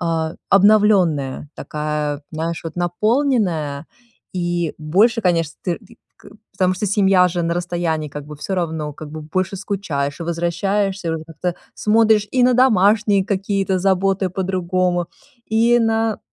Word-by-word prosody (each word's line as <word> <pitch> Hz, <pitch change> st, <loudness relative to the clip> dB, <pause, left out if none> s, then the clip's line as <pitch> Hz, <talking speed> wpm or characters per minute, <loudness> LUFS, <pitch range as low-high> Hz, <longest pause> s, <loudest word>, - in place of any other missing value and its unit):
а, 165 Hz, -2 st, -1 dB
обновлённая, 190 Hz, -9 st, +3 dB
такая, 150 Hz, -1 st, -3 dB
знаешь, 165 Hz, +2 st, -3 dB
вот 165 Hz, 0 st, -7 dB
наполненная. 175 Hz, -, 0 dB, 0.5 s
И 175 Hz, -3 st, -2 dB
больше, 205 Hz, +10 st, +2 dB
конечно, 165 Hz, -4 st, +1 dB
ты 175 Hz, -3 st, -1 dB
т 230 Hz, -, -19 dB, 0.2 s
к -, -, -19 dB, 0.3 s
потому 185 Hz, -1 st, +1 dB
что 205 Hz, +3 st, -2 dB
семья 195 Hz, -2 st, +4 dB
же 175 Hz, 0 st, -2 dB
на 170 Hz, 0 st, 0 dB
расстоянии, 170 Hz, -3 st, -2 dB
как 145 Hz, 0 st, -8 dB
бы, 150 Hz, 0 st, -9 dB
всё 190 Hz, +6 st, -4 dB
равно, 160 Hz, -4 st, -2 dB
как 150 Hz, +1 st, -10 dB
бы, 155 Hz, 0 st, -7 dB
больше 185 Hz, +5 st, -2 dB
скучаешь 175 Hz, -8 st, -3 dB
и -, -, -2 dB
возвращаешься, 185 Hz, +2 st, -1 dB
уже 160 Hz, 0 st, -4 dB
как-то 165 Hz, +2 st, -4 dB, 0.2 s
смотришь 215 Hz, -1 st, +3 dB
и 255 Hz, -, +3 dB
на 250 Hz, -, +4 dB
домашние 210 Hz, -4 st, +4 dB
какие-то 195 Hz, -2 st, -1 dB
заботы 195 Hz, 0 st, +1 dB
по-другому, 180 Hz, -1 st, -1 dB, 0.4 s
и 230 Hz, +2 st, +3 dB
на 225 Hz, -1 st, +1 dB
180 Hz, 145 wpm, -20 LUFS, 160-205 Hz, 0.5 s, семья